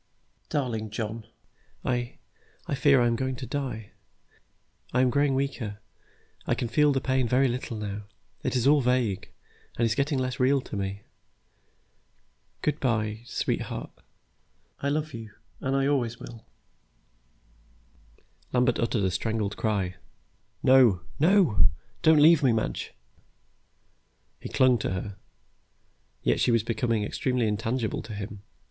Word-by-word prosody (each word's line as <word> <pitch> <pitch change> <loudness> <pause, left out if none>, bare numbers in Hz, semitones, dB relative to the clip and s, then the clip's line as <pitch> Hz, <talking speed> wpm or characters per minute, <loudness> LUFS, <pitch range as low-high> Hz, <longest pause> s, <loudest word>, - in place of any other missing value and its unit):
"Darling 115 -7 -2
John, 110 +1 -5 0.6
I 120 -1 -1 0.5
I - - -3
fear 140 -1 +4
I - - +4
am 120 - +3
really - - -1
going 130 -1 -1
to 130 - -6
die. 125 -6 -4 1.0
I 125 - +3
am 130 -1 +3
growing 140 0 +2
weaker. 130 -6 -2 0.7
I - - +2
can 120 - -2
feel 150 +5 +4
the 135 - +1
pain 130 -1 +1
very 130 +3 +3
little 120 -2 -3
now. 105 -1 -5 0.4
It - - -2
is 125 -1 +1
all 145 +1 +5
vague, 120 -6 0 0.5
and 115 - +2
is 115 - +2
getting 140 +4 0
less 130 -1 -2
real 135 +2 +4
to - - -8
me. 100 0 -3 1.6
Good 150 - 0
by, 110 -4 0
sweetheart, 120 - -3 0.9
I 140 - 0
love 155 +2 -1
you, 110 -2 -8 0.2
and 135 0 -1
I 135 0 +2
always 120 -5 0
will 115 -2 -10 1.4
" - - -33
Lambert 125 -1 +2
uttered 115 -3 0
a 95 - +1
strangled 105 +2 -1
cry, 95 -5 -1 0.7
"No, 125 -9 +6 0.2
no. 170 - +5 0.3
Don't 160 0 +6
leave 160 0 +7
me, 130 -3 +4
Madge." 110 - -2 1.5
He - - -7
clung 130 -2 +4
to 95 - -2
her, 95 +2 -5 1.1
yet - - +2
she - - +3
was 115 -2 +3
becoming 115 -2 0
extremely 125 +2 0
intangible 110 +2 -1
to 110 0 -8
him. 100 0 -6
120 Hz, 140 wpm, -27 LUFS, 110-135 Hz, 1.6 s, leave